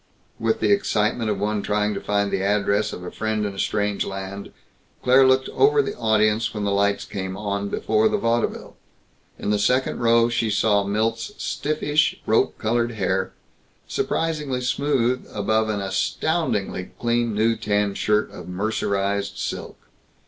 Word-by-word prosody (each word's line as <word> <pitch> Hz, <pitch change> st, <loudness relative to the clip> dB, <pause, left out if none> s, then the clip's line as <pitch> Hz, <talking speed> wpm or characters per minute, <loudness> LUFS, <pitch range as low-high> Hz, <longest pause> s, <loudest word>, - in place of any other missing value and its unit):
With 115 Hz, 0 st, 0 dB
the -, -, +3 dB
excitement 115 Hz, -, +1 dB
of 105 Hz, -, 0 dB
one 105 Hz, +1 st, -1 dB
trying 105 Hz, +1 st, 0 dB
to -, -, -4 dB
find 100 Hz, 0 st, 0 dB
the 95 Hz, -, 0 dB
address 100 Hz, +1 st, +1 dB
of 90 Hz, -, -7 dB
a 90 Hz, -, -6 dB
friend 110 Hz, -1 st, -1 dB
in 100 Hz, -, -3 dB
a 95 Hz, -, -8 dB
strange 105 Hz, -1 st, 0 dB
land 95 Hz, +1 st, -6 dB, 0.5 s
Claire 130 Hz, +1 st, +6 dB
looked 130 Hz, 0 st, +3 dB
over 435 Hz, +1 st, +3 dB
the 430 Hz, -, 0 dB
audience 110 Hz, 0 st, +1 dB
when 105 Hz, -, -2 dB
the 100 Hz, -, 0 dB
lights 100 Hz, 0 st, +1 dB
came 95 Hz, -2 st, -5 dB
on 100 Hz, -1 st, -2 dB
before 110 Hz, +2 st, +2 dB
the -, -, +1 dB
vaudeville. 115 Hz, 0 st, -1 dB, 0.6 s
In 105 Hz, -, -2 dB
the 105 Hz, -, +1 dB
second 125 Hz, +5 st, +1 dB
row 115 Hz, 0 st, +4 dB
she 115 Hz, -1 st, 0 dB
saw 105 Hz, -1 st, +2 dB
Milt's 115 Hz, -, -1 dB
stiffish, 150 Hz, 0 st, 0 dB
rope 110 Hz, -, +2 dB
colored 120 Hz, +1 st, 0 dB
hair 95 Hz, -2 st, -1 dB, 0.5 s
surprisingly 150 Hz, -6 st, -1 dB
smooth 130 Hz, -1 st, 0 dB
above 110 Hz, +2 st, 0 dB
an 105 Hz, -2 st, -1 dB
astoundingly 100 Hz, -, -1 dB
clean 120 Hz, -2 st, 0 dB
new 115 Hz, +2 st, +2 dB
tan 105 Hz, -2 st, 0 dB
shirt 105 Hz, +2 st, +1 dB
of -, -, -10 dB
mercerized 100 Hz, 0 st, -1 dB
silk. -, -, -5 dB
110 Hz, 155 wpm, -23 LUFS, 100-120 Hz, 0.6 s, Claire